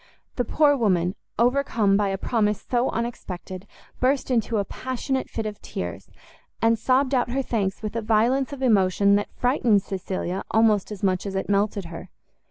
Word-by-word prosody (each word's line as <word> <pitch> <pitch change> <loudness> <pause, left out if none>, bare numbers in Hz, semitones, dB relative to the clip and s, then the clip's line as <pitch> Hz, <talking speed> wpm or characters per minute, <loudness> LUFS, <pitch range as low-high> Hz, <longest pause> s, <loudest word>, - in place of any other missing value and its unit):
The 245 - 0
poor 295 -2 +3
woman, 185 -7 +1 0.2
overcome 235 -4 +2
by 205 0 +2
a 195 0 -1
promise 210 -1 0
so 245 +1 +1
unexpected, 190 -5 -5 0.3
burst 265 +1 +1
into 230 -2 +1
a 200 - 0
passionate 260 +3 -3
fit 225 - -4
of 210 -1 -6
tears, - - -6 0.5
and 225 0 +2
sobbed 260 +3 +2
out 245 -2 +2
her 270 +2 -1
thanks 205 -4 -2
with 215 +1 -4
a 230 - -1
violence 235 +5 +2
of 275 -2 -6
emotion 200 -3 +3
that 205 - -3
frightened 240 -5 +2
Cecilia 190 -1 -4
almost 220 -2 +3
as 205 -2 -8
much 185 0 +1
as 195 - -5
it 190 - -2
melted 200 -1 +1
her. 170 +2 -9
215 Hz, 175 wpm, -24 LUFS, 195-245 Hz, 0.5 s, poor